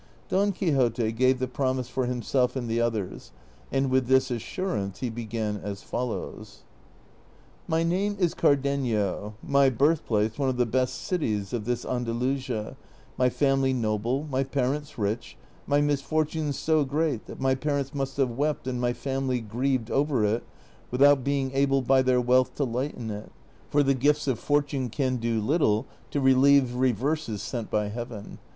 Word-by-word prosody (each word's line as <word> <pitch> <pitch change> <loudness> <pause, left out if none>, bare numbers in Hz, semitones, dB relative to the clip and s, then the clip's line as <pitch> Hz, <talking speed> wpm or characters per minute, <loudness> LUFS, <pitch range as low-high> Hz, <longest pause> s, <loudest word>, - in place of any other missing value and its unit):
Don 200 +2 +2
Quixote 125 - +1
gave 130 +3 +3
the 130 0 -2
promise 130 -1 -1
for 125 0 -2
himself 125 +1 0
and 125 -3 -3
the 115 +1 0
others, 105 - -3 0.4
and 135 -1 +1
with 130 -1 +2
this 130 0 +3
assurance 110 - -3
he 125 -3 -1
began 110 -2 -3
as 100 -1 -6
foUoAvs: 125 -2 -5 1.0
My 160 +1 +1
name 190 +5 0
is 175 -3 +2
C'ardenio, 120 -8 0
my 140 -1 +4
birthplace 120 -5 +1
one 135 -2 +2
of 130 - -2
the 125 - +3
best 125 +2 0
cities 110 - -1
of 115 -3 -2
this 120 0 -2
Andakisia,' 125 0 -2 0.4
my 125 0 +3
family 135 0 +2
noljle, 115 +5 -1
my 135 -2 0
parents 140 +2 -2
rich, 110 +2 -3 0.3
my 145 0 +3
misfortune 150 +1 0
so 155 +2 +1
great 145 -3 -1
that - - -9
my 130 0 +2
])arents 140 0 -2
must 135 -1 -3
have 135 -3 +2
Avept 145 +5 -1
and 125 -1 -2
my 120 0 +1
family 135 -1 -2
grieved 120 +2 -1
over 140 -5 +1
5. 110 +3 +1 0.6
Avithout 140 -1 +6
being 140 -1 0
able 135 0 +2
by 130 +1 +4
their 130 -1 +3
wealth 125 +1 +2
to 145 - 0
lighten 125 -2 -3
it; 105 0 -7 0.4
for 145 0 +3
the 135 0 +3
gifts 145 +3 +1
of 125 -4 0
fortune 145 -3 0
can 130 +1 0
do 115 -1 0
little 110 -2 +2 0.2
to 145 - -1
relieve 135 -1 +5
reverses 130 -1 0
sent 120 -4 -4
by 105 -1 0
Heaven. 115 -2 -7
130 Hz, 160 wpm, -27 LUFS, 115-140 Hz, 1.0 s, Avithout